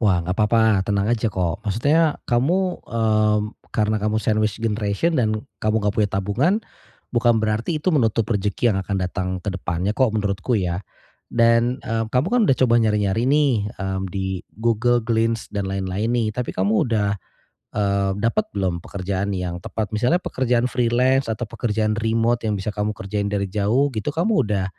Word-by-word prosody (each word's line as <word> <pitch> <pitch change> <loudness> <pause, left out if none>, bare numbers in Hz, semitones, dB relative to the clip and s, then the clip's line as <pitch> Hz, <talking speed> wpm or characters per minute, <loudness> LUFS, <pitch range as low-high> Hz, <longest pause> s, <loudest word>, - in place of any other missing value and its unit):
Wah, 95 -6 +3
nggak 90 +2 -3
papa, 110 -2 +3
tenang 100 0 0
aja 115 -2 0
kok, 85 -3 -1
maksudnya 145 - +2
kamu, 175 +10 +1
mmm, 110 -2 +2 0.3
karena 110 0 +1
kamu 105 +1 0
sandwich 110 -1 0
generation 110 +8 0
dan 110 -3 +1 0.2
kamu 110 +1 0
nggak 105 -1 0
punya 105 -2 +2
tabungan, 105 - +1 0.6
bukan 120 -2 +2
berarti 110 +9 0
itu 155 +5 0
menutup 115 -7 +2
rezeki 105 +3 +1
yang 95 - -1
akan 95 +1 -3
datang 90 0 -3 0.2
ke 100 - -2
depannya 90 +1 -2
kok, 130 +4 +2
menurutku 100 +3 0
ya. 90 -3 -1 0.5
Dan, 115 +2 +2
eee, 115 0 -1
kamu 125 +7 +1
kan 245 - +3
udah 135 - +4
coba 120 -2 +3
nyari-nyari 105 -1 +1
nih, 135 -7 +2
mmm, 95 0 -3
di 95 0 -3 0.2
Google, 120 +2 +1
Glints, 115 0 0
dan 100 -2 -2
lain-lain 95 +2 -2
nih, 120 -2 +1
tapi 125 +2 -4
kamu 105 +6 +2
udah, 105 -3 +1 0.7
eee, 100 -1 +1
dapat 115 - 0
belum 90 -4 -2
pekerjaan 100 +1 -3
yang 90 -2 -4
tepat 110 -1 -3
misalnya 125 +11 +2
pekerjaan 125 -6 0
freelance 125 +1 +2
atau 110 +1 -4
pekerjaan 110 -1 -1
remot 115 +1 +1
yang 105 -3 -1
bisa 95 - -6
kamu 105 0 -1
kerjain 100 +1 -3
dari 100 -1 -1
jauh 105 +8 +1
gitu 110 +7 -2
kamu 200 +8 +2
udah, 100 -3 -1
110 Hz, 170 wpm, -22 LUFS, 100-120 Hz, 0.7 s, udah